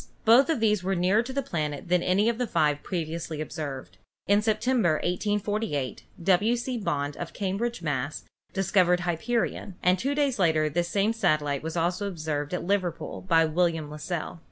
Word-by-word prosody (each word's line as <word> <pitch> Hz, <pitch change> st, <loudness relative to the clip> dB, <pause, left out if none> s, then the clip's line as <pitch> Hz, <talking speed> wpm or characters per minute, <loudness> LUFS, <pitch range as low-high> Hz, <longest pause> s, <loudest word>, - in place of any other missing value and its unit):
Both 245 Hz, +6 st, +6 dB
of 320 Hz, -6 st, +1 dB
these 210 Hz, -3 st, +2 dB
were 190 Hz, +1 st, 0 dB
nearer 185 Hz, +5 st, +3 dB
to 245 Hz, +2 st, -6 dB
the 275 Hz, +1 st, -1 dB
planet 150 Hz, -, -3 dB
than 180 Hz, 0 st, +3 dB
any 195 Hz, +5 st, +2 dB
of 235 Hz, 0 st, 0 dB
the 245 Hz, -, 0 dB
five 150 Hz, -6 st, +1 dB
previously 165 Hz, -3 st, -4 dB
ob 155 Hz, -, -5 dB
served. 140 Hz, -5 st, -6 dB, 0.3 s
In 205 Hz, +1 st, +4 dB
September, 220 Hz, -3 st, +2 dB
1848, 205 Hz, -, -1 dB, 0.2 s
W. 195 Hz, +6 st, +3 dB
C. 245 Hz, 0 st, -3 dB
Bond, 145 Hz, -7 st, -2 dB
of 175 Hz, -, -6 dB
Cambridge, 200 Hz, +1 st, -2 dB
Mass., 145 Hz, -1 st, -2 dB, 0.3 s
discovered 185 Hz, -2 st, +2 dB
Hyperion, 185 Hz, +3 st, -1 dB
and 180 Hz, 0 st, +3 dB
two 275 Hz, +6 st, -1 dB
days 285 Hz, -6 st, +1 dB
later 160 Hz, -4 st, +3 dB
this 175 Hz, +2 st, 0 dB
same 205 Hz, +5 st, +1 dB
satellite 150 Hz, -10 st, +1 dB
was 160 Hz, +2 st, -4 dB
also 175 Hz, +4 st, 0 dB
observed 155 Hz, -5 st, -3 dB
at 180 Hz, -, -2 dB
Liverpool 185 Hz, -3 st, -1 dB
by 165 Hz, -3 st, +3 dB
William 160 Hz, -2 st, 0 dB
Las 150 Hz, 0 st, -8 dB
sell. 175 Hz, -1 st, -4 dB
180 Hz, 180 wpm, -27 LUFS, 155-210 Hz, 0.3 s, Both